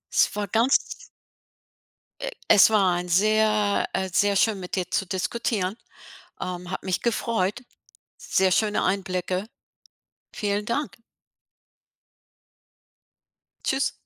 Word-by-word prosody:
Es - - +5
war 205 -1 -2
ganz 230 +7 +4 1.4
äh, - - -3 0.2
es 205 -1 +7
war 195 -5 +3
ein 175 0 -4
sehr 215 +2 +2
äh, 190 0 -1
sehr 200 +3 +2
schön 210 +1 +2
mit 180 -1 -5
dir 180 -2 -2
zu 195 +1 0
diskutieren. 190 +1 -2 0.6
Ähm, 180 0 -5
hat 185 - -5
mich 185 -2 -1
gefreut. 230 -1 -1 0.5
Sehr 190 0 +1
schöne 210 +2 +1
Einblicke. 185 +1 -2 0.8
Vielen 205 0 -2
Dank. 280 +7 -3 2.7
Tschüss. 270 +1 0
200 Hz, 105 wpm, -25 LUFS, 185-220 Hz, 2.7 s, es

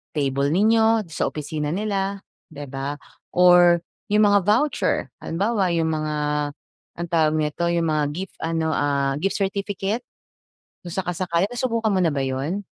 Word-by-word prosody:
table 140 -1 0
ninyo, 220 +2 +3
sa 155 - -1
opisina 150 0 -4
nila, 200 0 -2 0.3
'di 145 -3 -8
ba, 135 +2 -4 0.4
or 175 -1 +6 0.3
yung 210 0 +5
mga 200 -2 +3
voucher, 235 +9 +2 0.2
halimbawa, 195 +1 0
yung 165 -1 +1
mga, 155 -1 -2 0.8
anong 170 0 -4
tawag 160 -2 +3
nito, 155 +3 -1
yung 170 -1 +1
mga 155 -1 +1
gift 185 +4 -7
ano, 165 0 -1
ah, 140 -2 +1
gift 190 +6 -1
certificate. 200 +3 -2 0.8
Kung 175 - -6
saka-sakali 180 0 -1
nasubukan 230 -2 -1
mo - - +2
na 165 -4 +2
ba 140 - -1
yun? 140 +10 -2
175 Hz, 145 wpm, -23 LUFS, 155-200 Hz, 0.8 s, or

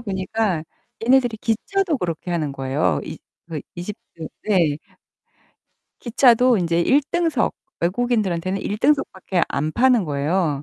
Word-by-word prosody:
보니까 190 -4 -2 0.4
얘네들이 245 -1 +3
기차도 305 - -1
그렇게 175 0 -4
하는 155 -5 -1
거예요. 130 - 0
이 - - -7 0.3
그 155 -3 -4
이집트 175 -3 -8 0.2
네. 170 -8 +2 1.2
기차도 245 0 +4
인제 170 -1 +1
일등석. 295 - +1 0.3
외국인들한테는 190 -2 0
일등석밖에 205 - 0
안 150 +3 -2
파는 245 -3 +4
거예요. 150 0 0
190 Hz, 280 characters per minute, -22 LUFS, 165-240 Hz, 1.2 s, 기차도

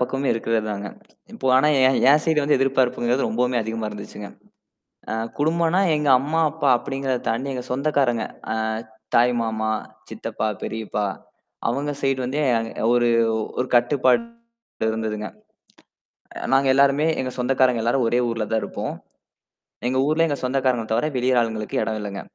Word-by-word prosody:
பக்கமும் 135 +2 0
இருக்கிறதாங்க. 110 -3 -2 0.5
இப்ப 130 - 0
ஆனா 150 +3 +4 0.2
என் 130 - +3
என் 150 +1 +5
சைடு 160 -3 +2
வந்து 145 0 +3
எதிர்பார்ப்புங்கிறது 130 -1 +1
ரொம்பவுமே 125 +2 0
அதிகமா 110 0 -3
இருந்துச்சுங்க. 105 0 -8 0.8
ஆ, - - -1 0.2
குடும்பன்னா 165 +4 +2 0.2
எங்க 150 -1 -1
அம்மா, 155 +4 0
அப்பா 150 -2 -1
அப்படிங்கிறத 135 -2 -3
தாண்டி 130 +5 -1
எங்க 125 -1 -5
சொந்தக்காரங்க. 130 -4 +1 0.3
ஆ, - - -2 0.6
தாய்மாமா, 115 -2 +1 0.4
சித்தப்பா, 110 -1 -3
பெரியப்பா. 110 -2 -3 0.6
அவங்க 140 +4 -2
சைடு 135 -1 +1
வந்து 140 +4 -2 0.5
ஒரு 120 0 +3 0.5
ஒரு 125 - 0
கட்டுப்பாடு 130 - +3 0.7
இருந்ததுங்க. 110 -1 -3 1.2
அ - - -1
நாங்க 135 0 +3
எல்லாருமே 140 +3 +4
எங்க 130 -1 -3
சொந்தக்காரங்க 125 -2 +2
எல்லாரும் 120 +1 +1
ஒரே 120 +2 +2
ஊர்லதான் 110 -1 -1
இருப்போம். - - -5 0.9
எங்க 130 +1 0
ஊர்ல 160 +2 +3
எங்க 145 -2 -2
சொந்தக்காரங்க 130 -3 0
தவிர 120 +7 +1
வெளி 125 +1 0
ஆளுங்களுக்கு 110 -2 -2
எடம் 110 -1 -3
இல்லங்க. 100 -1 -5
125 Hz, 135 wpm, -23 LUFS, 115-140 Hz, 1.2 s, என்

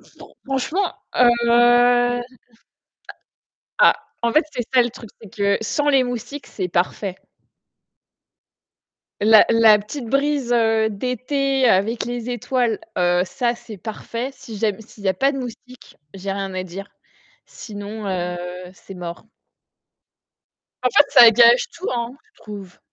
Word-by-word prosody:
c'est - - -24
trop - - -15
franchement, 275 +9 -1 0.2
heu, 245 -1 +6 0.2
a 245 0 +4 1.6
ah, 485 - +6 0.3
en 235 - +1
fait, 305 +3 +3
c'est 245 -4 -3
ça 250 - +6
le 240 - -3
truc, 225 -2 -12
c'est 215 - -13
que 200 -2 +1
sans 290 +7 -1
les 270 -2 +4
moustiques, 245 +4 -6
c'est 185 -3 -5
parfait. 180 +2 -2 2.1
La 220 0 +7
la 225 -2 +6
petite 235 +5 -7
brise, 275 -1 0
heu, 225 -2 +2
d'été 255 +4 -1
avec 220 +3 +1
les 240 0 -5
étoiles, 240 -1 -1 0.2
heu, 175 0 +2
ça, 240 +3 -1
c'est 225 -3 -11
parfait. 230 +5 -6
Si 225 -4 -11
ja 215 +1 0
s'il 215 -2 -15
y - - +1
a 190 - +1
pas 270 +8 +2
de 280 - -5
moustiques, 250 0 -10 0.2
j'ai 195 +1 -5
rien 195 -1 -5
à 185 - -3
dire, 195 +3 -9 0.6
sinon, 210 0 -8
heu, 180 -1 -3 0.3
c'est 195 - -13
mort. 175 +2 -8 1.6
En 250 - +3
fait, 285 +4 +5
ça 235 -2 +9
gâche 235 +2 +5
tout, 360 - -6
hein, 235 0 -3 0.2
je - - -23
trouve. 200 -4 -10
230 Hz, 145 wpm, -21 LUFS, 205-250 Hz, 2.1 s, ça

